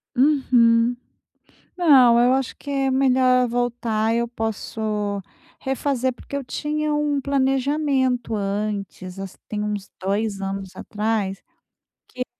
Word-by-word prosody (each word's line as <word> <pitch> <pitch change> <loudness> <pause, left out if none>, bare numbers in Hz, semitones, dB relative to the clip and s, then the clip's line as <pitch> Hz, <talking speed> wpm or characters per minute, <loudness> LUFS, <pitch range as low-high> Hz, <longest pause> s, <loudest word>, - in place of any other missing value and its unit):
Uhum, 245 -4 +4 0.8
não 265 -9 +6
eu 250 +1 +4
acho 265 -2 -1
que 285 - -11
é 270 -1 +1
melhor 255 -1 +4
eu 245 - -1
voltar, 235 -2 0
eu 235 +1 0
posso 225 -1 -4 0.8
refazer, 265 -1 -1
porque 280 - -9
eu 275 - -4
tinha 300 +3 -2
um 295 -1 +1
planejamento 270 -2 +1
antes, 200 -2 -3
assim 195 -1 -7
tem 210 -1 -3
uns 210 -2 -4
2 200 +1 -1
anos 195 -1 -5
atrás, 210 -2 -2 0.7
que 255 - -9
eu - - 0
245 Hz, 125 wpm, -23 LUFS, 215-270 Hz, 0.8 s, não